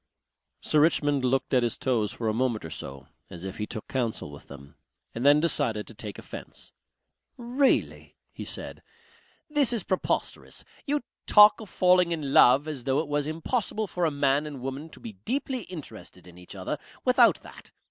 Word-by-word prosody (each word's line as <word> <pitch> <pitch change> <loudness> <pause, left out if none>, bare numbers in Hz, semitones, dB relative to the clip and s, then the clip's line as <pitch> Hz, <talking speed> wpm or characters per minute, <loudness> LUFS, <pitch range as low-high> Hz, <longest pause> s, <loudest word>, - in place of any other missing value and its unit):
Sir 155 - +2
Richmond 145 -3 +2
looked 130 +2 0
at 125 - +5
his 120 -2 0
toes 115 -5 0
for 115 - -4
a 110 - +1
moment 115 -4 -1
or 80 - -7
so 70 -2 -8 0.2
as 85 - -9
if 95 +1 -6
he 105 - -2
took 110 -3 -7
counsel 115 - -2
with 70 - -13
them 70 0 -12 0.4
and 115 - -4
then 145 +2 +6
decided 135 -9 0
to - - -12
take 105 -1 -8
offence. - - -10 0.7
"Really!" 250 +3 0 0.2
he - - -8
said, - - -6 0.7
"this 295 -5 +2
is 230 -6 -1
preposterous. 185 - -3 0.2
You 295 +1 0 0.3
talk 210 +1 +7
of 215 - -10
falling 180 -1 +3
in 150 -5 -3
love 135 +5 +6
as 140 -6 -5
though 135 0 +1
it 155 +1 -1
was 145 0 0
impossible 215 +7 -2
for 180 -3 -2
a - - +3
man 140 0 +1
and 145 -3 -7
woman 135 +4 -5
to - - -14
be 230 -2 -8
deeply 255 -1 -2
interested 115 - -10
in 90 -1 -15
each 90 - -12
other - - -4 0.3
without - - +5
that. - - -14
145 Hz, 185 wpm, -27 LUFS, 115-180 Hz, 0.7 s, talk